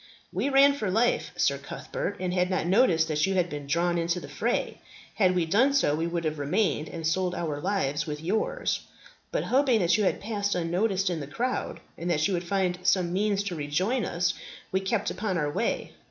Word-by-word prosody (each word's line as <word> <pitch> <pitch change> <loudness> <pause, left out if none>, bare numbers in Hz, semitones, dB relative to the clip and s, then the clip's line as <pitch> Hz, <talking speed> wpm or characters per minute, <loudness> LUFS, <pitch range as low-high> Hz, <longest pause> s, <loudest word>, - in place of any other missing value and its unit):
"We - - 0
ran 280 +1 +6
for 215 -8 -2
life, 225 +6 +1
Sir - - +1
Cuthbert, - - -5
and 180 -1 -2
had 180 0 +1
not 185 -3 0
noticed 175 -4 +4
that 155 -1 0
you 195 - 0
had 180 -2 +1
been 145 -1 -6
drawn 170 +3 +1
into 170 +1 0
the 145 - -9
fray. 225 - -2 0.3
Had 185 -3 +3
we 175 -2 +2
done 230 +12 +3
so, 205 - +3
we 165 +2 -1
would 170 0 -2
have 155 -1 -2
remained, 155 +1 0
and 165 -2 -6
sold 180 +2 0
our 155 -5 -3
lives 175 -6 -1
with 150 -1 -4
yours; 190 +8 -1 0.5
but - - 0
hoping 260 -2 +3
that 175 +4 +3
you - - +2
had 190 - +1
passed 205 -1 -2
unnoticed 185 +3 0
in 170 - -2
the 140 - -6
crowd, 245 - -3 0.2
and 170 +2 -3
that 160 -1 +2
you 200 - -1
would 175 -1 -1
find 180 -1 0
some 180 -1 +2
means 200 +1 +1
to 195 -4 -4
rejoin 180 - 0
us, 175 -1 0 0.4
we 190 - +2
kept 195 +3 -1
upon 190 -1 -2
our 150 -2 0
way. - - -1
180 Hz, 210 wpm, -27 LUFS, 165-205 Hz, 0.5 s, ran